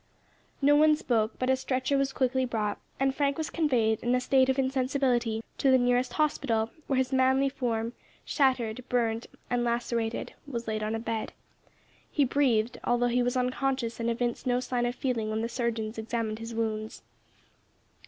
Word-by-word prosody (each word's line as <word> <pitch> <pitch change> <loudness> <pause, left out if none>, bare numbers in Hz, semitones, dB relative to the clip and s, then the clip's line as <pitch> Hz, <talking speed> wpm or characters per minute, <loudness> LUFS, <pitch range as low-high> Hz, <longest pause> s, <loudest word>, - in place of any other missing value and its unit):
No 290 +1 +6
one 305 +1 +6
spoke, 225 -7 0
but 255 - -1
a - - +4
stretcher 260 +1 -1
was 275 0 +1
quickly 260 0 +1
brought, 215 -4 -2 0.2
and 270 0 +2
Frank 280 0 0
was 315 -1 -3
conveyed 240 -9 +1
in 240 +1 +1
a - - +2
state 260 +1 +3
of 265 - +2
insensibility 255 -4 +1 0.2
to 275 - +3
the 260 - +6
nearest 245 0 +1
hospital, 235 -7 0 0.2
where 270 - +1
his 260 0 0
manly 265 +1 +3
form 235 -4 -2 0.3
shattered, 255 -4 +1
burned, 230 -2 0 0.2
and 245 -1 +1
lacerated 235 -1 -1
was 235 -4 -5
laid 215 -1 -2
on 215 +1 -1
a - - -2
bed. 225 -1 -3 0.8
He 290 - +3
breathed, 245 -4 +1
although 245 0 +2
he 245 +1 +2
was 245 +1 0
unconscious 255 -1 -1
and 230 0 0
evinced 240 +1 -2
no 245 0 +2
sign 245 -1 -1
of 245 - -3
feeling 235 -5 -1
when 215 0 -1
the 230 - -1
surgeons 230 -2 -2
examined 220 -1 -2
his 225 0 -6
wounds. 220 -1 -3
245 Hz, 175 wpm, -28 LUFS, 230-265 Hz, 0.8 s, No